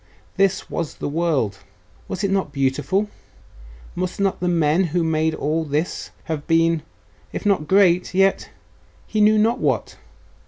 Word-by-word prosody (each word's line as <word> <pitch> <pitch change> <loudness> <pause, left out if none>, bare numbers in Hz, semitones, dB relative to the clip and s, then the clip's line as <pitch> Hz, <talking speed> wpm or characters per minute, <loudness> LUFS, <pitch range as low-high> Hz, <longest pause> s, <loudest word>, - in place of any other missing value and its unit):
This 195 -1 +1
was 165 -3 -4
the - - -4
world.... 145 - 0 0.5
Was 185 - -4
it 200 - +1
not 195 -6 0
beautiful?.... 140 +8 0 0.9
Must 185 +1 -4
not 195 -1 0
the 180 - -1
men 170 +1 +2
who 170 +1 0
made 160 0 +1
all 155 +3 -1
this 150 +3 -2
have 155 -3 -5
been 165 -1 +3 0.5
if - - -5
not 195 -7 +2
great.... 185 -2 +4
yet.... 195 +1 +2 0.6
he 215 - -1
knew 215 +1 +5
not 225 +4 +2
what? - - -1
170 Hz, 150 wpm, -22 LUFS, 155-195 Hz, 0.9 s, knew